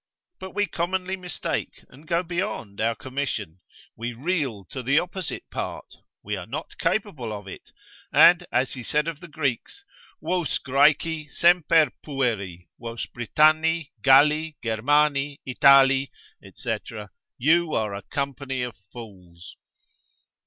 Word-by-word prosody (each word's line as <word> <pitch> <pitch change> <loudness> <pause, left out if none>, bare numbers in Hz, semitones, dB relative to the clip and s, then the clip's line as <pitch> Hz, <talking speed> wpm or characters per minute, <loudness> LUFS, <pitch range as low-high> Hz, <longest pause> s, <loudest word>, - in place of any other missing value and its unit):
But 190 - -9
we 205 - +2
commonly 185 +1 -2
mistake, 180 -1 -5
and 145 +5 -17
go 170 0 +1
beyond 175 - -4
our 115 +1 +1
commission, 115 - -4 0.4
we 120 +2 -4
reel 135 - -2
to 130 - -4
the 135 +4 +2
opposite 180 0 -2
part, - - -5 0.4
we 105 +1 -3
are 95 -1 -7
not 145 +7 -7
capable 155 - -1
of 105 -2 -7
it, 95 - -11 0.4
and 175 0 +6
as 130 - +1
he 130 - -6
said 150 +6 0
of 165 -3 -4
the 175 - -11
Greeks, 150 - -3 0.3
Vos 180 -5 -1
Graeci 150 +3 +2
semper 165 -4 +4
pueri, 110 - -2
vos 115 -1 -5
Britanni, 155 +5 +2
Galli, 150 +4 +4
Germani, 145 +5 +1
Itali, 135 +1 +5 0.4
&c. - - -3 0.6
you 160 +5 +3
are 105 -2 -1
a 100 - -5
company 140 0 -3
of 120 -3 -5 0.2
fools. 90 -7 -12
140 Hz, 130 wpm, -25 LUFS, 120-165 Hz, 0.6 s, and